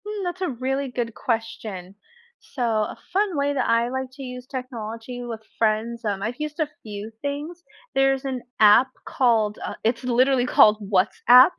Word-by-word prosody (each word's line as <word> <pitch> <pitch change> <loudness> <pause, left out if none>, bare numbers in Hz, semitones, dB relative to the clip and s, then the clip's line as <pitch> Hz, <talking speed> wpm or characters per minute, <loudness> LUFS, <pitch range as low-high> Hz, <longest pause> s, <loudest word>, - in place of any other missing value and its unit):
Hmm, 420 -1 -4
that's 355 +1 -4
a 365 - 0
really 265 +2 -2
good 240 -2 -3
question. 215 -5 -4 0.6
So 255 - -1
a 220 -2 0 0.2
fun 390 -4 +1
way 285 0 +1
that 280 - 0
I 230 +1 +3
like 260 +1 -3
to 270 - -9
use 250 -1 -7
technology 245 -2 -6
with 230 -2 -6 0.2
friends, 230 +2 0
um, 200 -2 -1
I've 240 +6 -3
used 300 +1 -4
a 310 - +2
few 210 0 -7
things. 295 +5 -4 0.3
There's 270 0 +2
an 260 -2 -2 0.2
app 215 +4 +7 0.2
called, 225 -5 +2
uh, - - -4
it's 230 +2 0
literally 255 +1 +3
called 210 -3 +6
WhatsApp. 240 - +6
245 Hz, 170 wpm, -24 LUFS, 225-270 Hz, 0.6 s, app